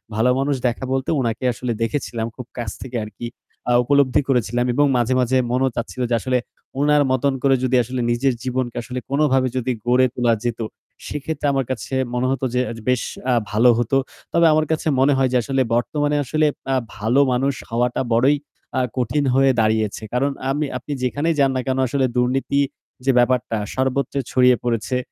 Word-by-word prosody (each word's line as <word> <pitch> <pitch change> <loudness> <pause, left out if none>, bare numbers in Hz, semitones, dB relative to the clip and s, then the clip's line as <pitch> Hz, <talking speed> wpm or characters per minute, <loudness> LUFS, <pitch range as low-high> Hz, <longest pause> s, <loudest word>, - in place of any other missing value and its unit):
ভালো 115 +3 +3
মানুষ 140 0 +1
দেখা 125 +2 -3
বলতে 135 0 -1
উনাকে 115 +1 -2
আসলে 120 0 -4
দেখেছিলাম। 115 -2 -2
খুব 125 - -8
কাছ 115 -4 -3
থেকে 125 -2 -5
আরকি 110 +3 -7 0.4
আ - - +3
উপলব্ধি 140 0 +3
করেছিলাম 120 -1 +1
এবং 145 +3 +3
মাঝে, 120 +2 +1
মাঝে 130 +1 +2
মনেও 130 +1 +2
চাচ্ছিল 120 +2 -4
যে 120 - +2
আসলে 130 -1 +1 0.4
উনার 145 0 +4
মতন 135 +1 +1
করে 135 -1 +4
যদি 130 0 +1
আসলে 125 +2 -4
নিজের 125 +2 +1
জীবনকে 125 -2 -2
আসলে 125 +1 -5
কোনভাবে 135 -2 +2
যদি 130 +1 -1
গড়ে 125 +1 +4
তোলা 120 -2 +2
যেত, 120 -1 -2 0.5
সেক্ষেত্রে 150 +1 -4
আমার 135 -2 0
কাছে 120 +1 -5 0.2
মনে 125 +1 0
হত 135 - -2
যে 125 - +2
আ - - -5 0.2
বেশ 125 -1 +2 0.3
আ - - +4 0.2
ভালো 115 +4 +5
হতো। 120 +3 +1 0.4
তবে 170 0 +4
আমার 155 0 +2
কাছে 160 0 -1
মনে 140 +2 +4
হয় 130 -1 +2
যে 125 - +3
আসলে 135 +1 0
বর্তমানে 145 +4 0
আসলে 155 +4 +2 0.3
আ - - +2 0.2
ভালো 110 +6 +1
মানুষ 135 +3 +1 0.2
হওয়াটা 120 +2 0
বড়ই 135 +5 +4 0.4
আ - - +2 0.2
কঠিন 125 +4 0
হয়ে 135 0 +5
দাঁড়িয়েছে। 110 -1 0
কারণ 140 +3 +1 0.2
আমি 145 +2 0
আপনি 150 - -9
যেখানেই 145 +6 0
যান 135 -1 +4
না 130 - 0
কেন 130 0 0
আসলে 135 +1 +1
দুর্নীতি 135 +3 +1 0.4
যে 135 - +4
ব্যাপারটা 120 -2 +1 0.2
সর্বত্র 130 +2 -1 0.2
ছড়িয়ে 125 -1 +5
পড়েছে। 120 +1 -1
130 Hz, 185 wpm, -21 LUFS, 120-135 Hz, 0.5 s, ভালো